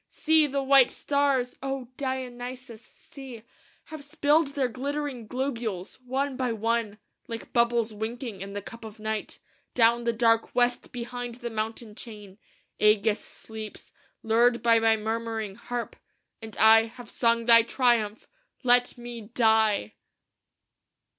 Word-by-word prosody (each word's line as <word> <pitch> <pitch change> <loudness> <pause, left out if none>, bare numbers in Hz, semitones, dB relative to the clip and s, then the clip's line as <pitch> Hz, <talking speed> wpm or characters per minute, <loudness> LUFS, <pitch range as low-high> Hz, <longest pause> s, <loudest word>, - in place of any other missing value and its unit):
See, 315 -1 +3
the 275 0 -2
white 270 -2 +6
stars, 280 -3 0
O 270 -2 -4
Dionysos! 255 -3 -5
see, 255 -3 -12 0.4
Have 310 -2 -9
spilled 295 0 +1
their 270 -3 +1
glittering 270 -1 -4
globules, 235 -6 -4
one 265 +2 -2
by 250 -2 -1
one, 225 -1 -1 0.3
Like 230 -1 -8
bubbles 235 -2 +2
winking 220 -1 -5
in 200 0 -7
the 205 -1 -5
cup 230 +2 -10
of 220 -1 -10
night, 215 0 -4 0.4
Down 235 0 +4
the 235 - +1
dark 230 0 +2
west 245 0 +1
behind 245 0 -6
the 240 -1 -6
mountain 220 0 -4
chain. 210 -4 -9 0.4
Ægeus 210 0 +3
sleeps, 220 -1 -10 0.3
lulled 235 +1 +3
by 230 -1 +5
my 225 0 +3
murmuring 220 -1 -3
harp; 240 +4 -5 0.5
And 220 -2 -9
I 225 0 +7
have 230 +1 -12
sung 230 -1 +1
thy 230 -1 +8
triumph. 230 -3 +1 0.4
Let 245 0 +3
me 240 -1 -8
die!" 220 - +3
235 Hz, 135 wpm, -27 LUFS, 220-255 Hz, 0.5 s, thy